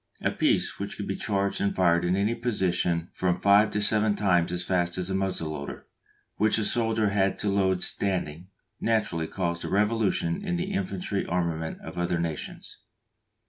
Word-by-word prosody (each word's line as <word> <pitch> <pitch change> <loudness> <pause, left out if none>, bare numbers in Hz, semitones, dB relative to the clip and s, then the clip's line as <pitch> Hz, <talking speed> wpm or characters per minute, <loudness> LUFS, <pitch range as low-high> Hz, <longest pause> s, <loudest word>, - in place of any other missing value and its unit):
A - - +2
piece - - +1
which - - -5
could - - -5
be - - -2
charged 100 -1 -1
and 100 0 0
fired 85 -2 +3
in 90 +1 +1
any 100 +4 +1
position 90 -7 0
from 90 -1 0
five 100 +2 +5
to 105 - -1
seven 105 0 +3
times 90 -5 +2
as 90 0 -1
fast 90 -1 0
as 90 0 -2
the - - -1
muzzle 95 -5 -1
loader, 70 -2 -7 0.5
which 110 +1 +3
the 110 - 0
soldier 110 -2 +2
had 100 -1 +1
to 105 - -1
load 95 -2 +1
standing, 90 -3 -1 0.3
naturally 100 -8 0
caused 85 -2 -2
a - - -4
revolution 115 - +1
in 180 -3 -1
the 185 +3 -2
infantry 185 - -2
armament 85 -2 -2
of - - -7
other 85 0 0
nations. 85 -2 -5
95 Hz, 180 wpm, -27 LUFS, 85-105 Hz, 0.5 s, five